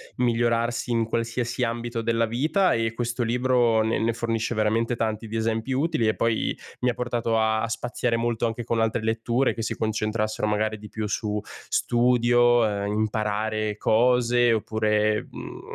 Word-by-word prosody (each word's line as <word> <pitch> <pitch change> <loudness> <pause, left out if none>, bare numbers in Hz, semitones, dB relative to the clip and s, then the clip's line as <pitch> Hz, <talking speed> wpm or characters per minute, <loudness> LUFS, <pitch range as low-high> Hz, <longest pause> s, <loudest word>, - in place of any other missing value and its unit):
migliorarsi 120 0 0
in 115 -1 +1
qualsiasi 115 +2 -2
ambito 115 0 -2
della 115 0 +1
vita. 155 - +1
E 115 0 0
questo 120 +1 -2
libro 120 -1 +2
ne 110 0 0
ne 115 +1 +1
fornisce 115 0 -2
veramente 115 +3 +1
tanti 110 0 -2
di 110 - -6
esempi 115 +2 -1
utili 140 -3 +1
e 110 - +1
poi 115 -1 0 0.2
mi 125 - +1
ha - - 0
portato 120 -2 -1
a 110 - +3 0.2
a 115 - -1
spaziare 120 0 -1
molto 115 0 0
anche 115 +1 -4
con 115 0 -1
altre 110 0 0
letture 115 +3 +1
che 115 - -5
si 110 - -2
concentrassero 110 0 -1
magari 110 +1 0
di 105 - -11
più 110 -1 -4
su 105 0 -2 0.3
studio, 120 -1 +3
ehm, 100 0 -2
imparare 110 0 0 0.4
cose 120 +1 +3
oppure, 110 -1 0
mhmm, - - -9
uhm, - - -10
115 Hz, 170 wpm, -25 LUFS, 110-120 Hz, 0.4 s, a